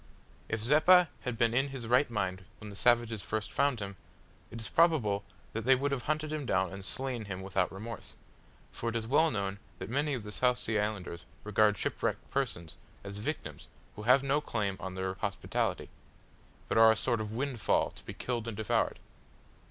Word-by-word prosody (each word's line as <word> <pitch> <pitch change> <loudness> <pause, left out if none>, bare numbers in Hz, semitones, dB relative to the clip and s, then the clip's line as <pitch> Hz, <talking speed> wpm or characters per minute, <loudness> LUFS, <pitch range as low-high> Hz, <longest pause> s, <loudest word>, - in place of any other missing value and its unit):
If 110 0 -1
Zeppa 160 +7 +6
had 125 -2 -4
been 115 -1 +3
in 135 +3 +2
his 135 -3 -6
right 125 +4 +3
mind 95 -4 -2
when 105 -1 -9
the - - -9
savages 120 -1 +3
first 110 +2 -3
found 140 -4 +2
him, 100 -1 -5 0.5
it 115 - -7
is 110 - -3
probable 125 -13 +3 0.3
that 115 - -2
they 130 +3 +6
would 140 +2 0
have 135 -3 -2
hunted 155 0 0
him 155 -1 -2
down 95 -7 +1
and 95 0 -7
slain 125 +1 -3
him 95 -2 -5
without 95 -1 0
remorse 110 +3 -7 0.6
for 115 - -3
it 115 - -5
is 115 -1 -1
well 150 +7 +4
known 100 -3 -2 0.2
that 95 +4 -6
many 145 +2 +1
of 120 - -5
the 105 - -7
South 125 +3 +2
Sea 110 -3 -1
Islanders 100 -5 -3 0.2
regard 105 0 +3
shipwrecked - - -2
persons 115 -12 -2 0.2
as 100 0 -7
victims 105 - -4 0.3
who - - -7
have 125 +5 +5
no 140 +2 +2
claim 105 -8 -1
on 95 -1 -5
their 95 0 -2
hospitality, 95 -1 -2 0.8
but - - +2
are 115 0 +9
a - - +2
sort 115 +1 0
of 105 -1 -4
windfall 125 -2 +1
to - - -13
be - - -8
killed 120 -2 -3
and 110 -3 -4
devoured. 110 +1 +1
115 Hz, 195 wpm, -31 LUFS, 100-130 Hz, 0.8 s, are